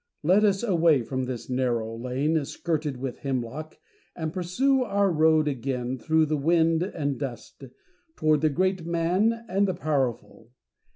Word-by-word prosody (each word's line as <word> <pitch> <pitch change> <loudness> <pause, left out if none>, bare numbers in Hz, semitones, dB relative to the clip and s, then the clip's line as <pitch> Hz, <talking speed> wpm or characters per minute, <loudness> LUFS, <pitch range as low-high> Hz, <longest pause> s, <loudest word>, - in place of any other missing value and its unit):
Let 185 +7 +4
us 200 0 +2
away 165 - +3
from 130 +2 -3
this 125 -2 -6
narrow 120 -3 -1
lane 135 +6 -1
skirted 150 -2 -3
with 130 -1 -5
hemlock, 135 +3 -4 0.4
and 160 -2 -4
pursue 255 +10 +1
our 200 -4 +1
road 155 -1 +3
again 130 -1 -3
through 160 +4 +2
the 155 0 -1
wind 165 +2 +2
and 150 -7 -2
dust, 135 -5 -7 0.5
toward 155 - +2
the 155 - +3
great 185 +4 0
man 180 +8 0
and 195 +1 +1
the 185 - -1
powerful. 135 -8 -2
155 Hz, 150 wpm, -26 LUFS, 130-180 Hz, 0.5 s, Let